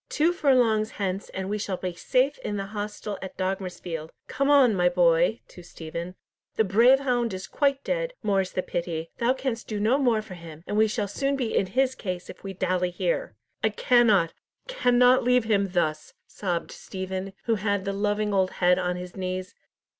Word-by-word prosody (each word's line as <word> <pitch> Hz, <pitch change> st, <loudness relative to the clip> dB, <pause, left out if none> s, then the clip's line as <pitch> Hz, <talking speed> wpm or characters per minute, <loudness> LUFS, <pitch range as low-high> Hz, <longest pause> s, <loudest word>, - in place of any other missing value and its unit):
Two 330 Hz, +3 st, +2 dB
furlongs 240 Hz, -9 st, +3 dB
hence, 195 Hz, -1 st, -3 dB
and 190 Hz, 0 st, -5 dB
we 210 Hz, +1 st, -2 dB
shall 200 Hz, -3 st, -3 dB
be 180 Hz, -1 st, -4 dB
safe 260 Hz, +10 st, +1 dB
in 205 Hz, -, -4 dB
the 195 Hz, -, -3 dB
hostel 210 Hz, 0 st, -5 dB
at 190 Hz, -, -8 dB
Dogmersfield. 185 Hz, -4 st, -4 dB, 0.2 s
Come 275 Hz, +1 st, -1 dB
on, 275 Hz, -5 st, +6 dB
my 180 Hz, -2 st, +3 dB
boy," 175 Hz, +4 st, +3 dB
to 180 Hz, -, -12 dB
Stephen, 170 Hz, +1 st, -7 dB, 0.4 s
"the 220 Hz, -, +3 dB
brave 235 Hz, +7 st, +5 dB
hound 240 Hz, -6 st, 0 dB
is 185 Hz, -, -6 dB
quite 280 Hz, -1 st, 0 dB
dead, -, -, -2 dB
more's 195 Hz, -3 st, +1 dB
the 185 Hz, -, -2 dB
pity. 165 Hz, -1 st, -4 dB
Thou 240 Hz, +2 st, +3 dB
canst 260 Hz, -3 st, -4 dB
do 210 Hz, -2 st, -3 dB
no 230 Hz, +7 st, +2 dB
more 235 Hz, -5 st, +2 dB
for 210 Hz, -, -10 dB
him, 165 Hz, -2 st, -11 dB
and 205 Hz, -, -3 dB
we 220 Hz, +1 st, +4 dB
shall 210 Hz, -1 st, -2 dB
soon 275 Hz, +7 st, -1 dB
be 250 Hz, -5 st, -2 dB
in 190 Hz, -, +2 dB
his 260 Hz, +6 st, +1 dB
case 180 Hz, -8 st, -5 dB
if -, -, -17 dB
we 195 Hz, -, -5 dB
dally 185 Hz, -1 st, 0 dB
here." -, -, -2 dB, 0.3 s
"I 220 Hz, -, +4 dB
cannot, 215 Hz, -6 st, +3 dB, 0.3 s
cannot 250 Hz, -, +4 dB
leave 250 Hz, 0 st, +3 dB
him 200 Hz, -3 st, +1 dB
thus," 155 Hz, -4 st, -1 dB
sobbed 175 Hz, -4 st, -3 dB
Stephen, 190 Hz, 0 st, -6 dB
who 230 Hz, -, +1 dB
had 200 Hz, -1 st, 0 dB
the 200 Hz, -, -1 dB
loving 205 Hz, +1 st, 0 dB
old 190 Hz, -1 st, +1 dB
head 180 Hz, 0 st, +3 dB
on 180 Hz, -1 st, -1 dB
his 180 Hz, 0 st, -8 dB
knees. 185 Hz, 0 st, -4 dB
200 Hz, 190 wpm, -26 LUFS, 185-245 Hz, 0.4 s, on